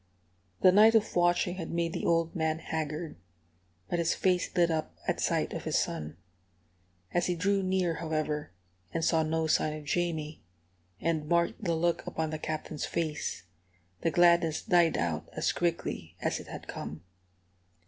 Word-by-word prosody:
The 185 - +7
night 215 +4 +7
of 220 -1 +2
watching 175 +1 +2
had 165 -3 -5
made 170 -1 -1
the - - -2
old 165 0 +2
man 160 -1 0
haggard, 160 - -4 0.7
but 175 - -1
his 170 0 +2
face 180 -1 +1
lit 170 -1 +4
up 160 -1 -3
at - - 0
sight - - 0
of - - -5
his - - +1
son. 75 +1 -2 1.0
As 175 - +2
he 180 - 0
drew 200 +3 +1
near, 185 -2 +1
however, 155 - -2 0.4
and 165 - -1
saw 160 -1 +3
no 160 +1 0
sign 155 -1 +2
of 155 - -8
Jamie, 160 -1 -2 0.6
and 160 -2 -1
marked 170 +5 +1
the 170 -4 +1
look 170 +1 0
upon 160 -1 -2
the 155 - -4
Captain's 155 -1 -4
face, 155 - -2 0.6
the - - +2
gladness 170 -2 +4
died 175 -5 +4
out 80 -3 -2
as - - +1
quickly 165 - -2
as - - -1
it - - -10
had - - -8
come. 75 +2 -6
165 Hz, 165 wpm, -30 LUFS, 155-175 Hz, 1.0 s, The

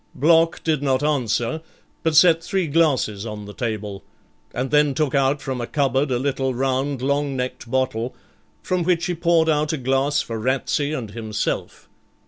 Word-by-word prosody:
Block 165 +3 +3
did 155 -3 +1
not 135 -1 +1
answer, 135 0 0 0.4
but 160 -1 0
set 165 0 +6
three 190 +1 0
glasses 140 -10 +1
on 105 -2 -6
the 105 - -9
table, 105 -4 -4 0.5
and 130 +2 -3
then 150 -2 +3
took 150 -1 0
out 135 0 +1
from 130 -2 -3
a 120 - -4
cupboard 140 0 +1
a 125 - +1
little 135 0 -1
round 135 +1 -1
long 140 0 0
necked 125 -2 -4
bottle, 130 -2 -1 0.5
from 185 -1 0
which 170 -1 +1
he 180 - -1
poured 170 -1 +2
out 150 -1 +1
a - - -1
glass 135 +2 +1
for 115 -3 -4
Ratsey 135 +4 0
and 120 -9 -4
himself. 110 -1 -4
135 Hz, 170 wpm, -22 LUFS, 125-155 Hz, 0.5 s, set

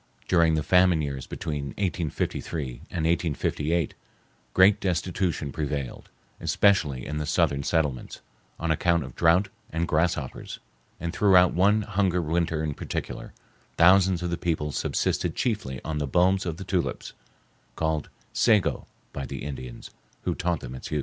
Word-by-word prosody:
During 85 -3 +4
the 75 - 0
famine 90 -2 +4
years 70 -3 -4
between 75 -2 -4
1853 85 -5 -2 0.2
and 80 -3 -2
1858, 80 -1 0 0.6
great 95 +2 +6
destitution 90 -4 -1
prevailed, 70 -4 -4 0.3
especially 75 -11 +2
in 75 +1 -4
the 75 -1 -3
southern 70 -1 +2
settlements, 75 -4 -1 0.4
on 85 0 0
account 85 +1 +2
of 65 -2 -10
drouth 85 +4 +3 0.2
and 85 +1 -1
grasshoppers, 80 -4 -1 0.4
and 85 +1 -3
throughout 90 -3 +5
one 105 +4 +3
hungry 95 -3 +1
winter 80 0 0
in 75 -2 -1
particular, - - -5 0.5
thousands 90 0 +5
of 90 - -2
the 85 - -2
people 80 -3 -1
subsisted - - -1
chiefly 100 - -2
on 80 -1 -2
the 75 - -1
bulbs 95 +5 +2
of 80 -1 -3
the 95 - -6
tulips, 95 -2 -2 0.6
called 80 -1 -1 0.2
"sego" 105 -5 +2 0.3
by 70 -2 -4
the 65 +1 -6
Indians, 65 -4 -7 0.3
who - - 0
taught 85 -3 -1
them 60 0 -7
its 65 - -7
use. 75 - -1
85 Hz, 145 wpm, -26 LUFS, 75-90 Hz, 0.6 s, great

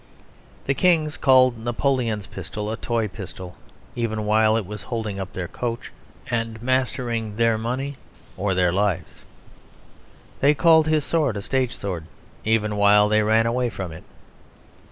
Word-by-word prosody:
The 140 - +2
kings 160 -2 +2
called 130 -3 +4
Napoleon's 120 -2 -1
pistol 105 0 -6
a - - -2
toy 115 -3 -1
pistol 95 -3 -9 0.4
even 110 -3 -2
while 110 +1 +3
it 110 - -2
was 105 +2 -7
holding 110 -2 -4
up 95 -1 -6
their 90 -2 -4
coach 120 +3 -4 0.4
and 115 -1 -2
mastering 120 -3 -1
their 115 0 +3
money 130 +5 -3 0.4
or 95 -1 -1
their 90 -1 +3
lives; 100 -2 -1 1.2
they 145 +2 +4
called 160 -1 +5
his 155 -2 +1
sword 145 -10 +1
a - - -4
stage 130 0 -1
sword 90 -6 -5 0.4
even 105 -1 +1
while 105 0 +5
they 110 0 +3
ran 110 +1 +3
away 120 +1 0
from 95 -5 -6
it. 80 - -10
115 Hz, 150 wpm, -23 LUFS, 105-130 Hz, 1.2 s, called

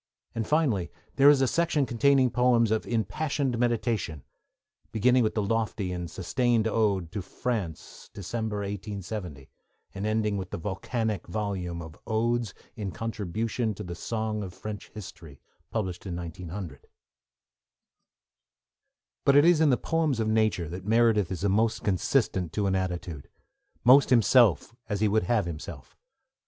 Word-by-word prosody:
And, 115 -2 -3
finally, 130 - +1 0.3
there 140 +1 +8
is 145 -2 +5
a 135 - +3
section 160 -1 +1
containing 130 +1 +3
poems 120 -2 +3
of 110 - 0
impassioned 120 - -1
meditation, 115 - -1 0.7
beginning 125 +3 +3
with 110 - 0
the 105 - +1
lofty 105 -2 -1
and 90 -1 -4
sustained 115 +5 +1
ode 100 -6 +1
to 105 - -3
France, 95 - -5
December 105 +1 -4
1870, 100 -7 -6 0.5
and 100 +2 -3
ending 110 -1 0
with 95 -1 -5
the - - -4
volcanic 105 +4 -3
volume 90 -3 -3
of 80 -1 -12
Odes 115 -1 0 0.2
in 105 -4 -4
Contribution 110 +2 -3
to - - -7
the 90 - -6
Song 110 +3 -3
of 90 -3 -7
French 105 -2 -7
History, 80 -8 -11 0.3
published 95 -4 -3
in 90 - -4
1900. 90 +1 -7 2.4
But 140 - +4
it 145 +2 +7
is 170 -2 +5
in 155 - +5
the 125 - +4
poems 160 -5 0
of 110 - 0
nature 110 -6 +1
that 90 +3 -7
Meredith 110 -3 +3
is 95 0 -4
most 110 +3 +1
consistent 95 - +1
to 105 - 0
an 95 - +1
attitude, 90 -5 -3 0.5
most 135 +3 +7
himself 115 - +4 0.2
as 105 -2 -1
he 110 - +4
would 105 -2 +1
have 110 -1 +1
himself. 80 -4 -8
105 Hz, 145 wpm, -27 LUFS, 95-120 Hz, 2.4 s, there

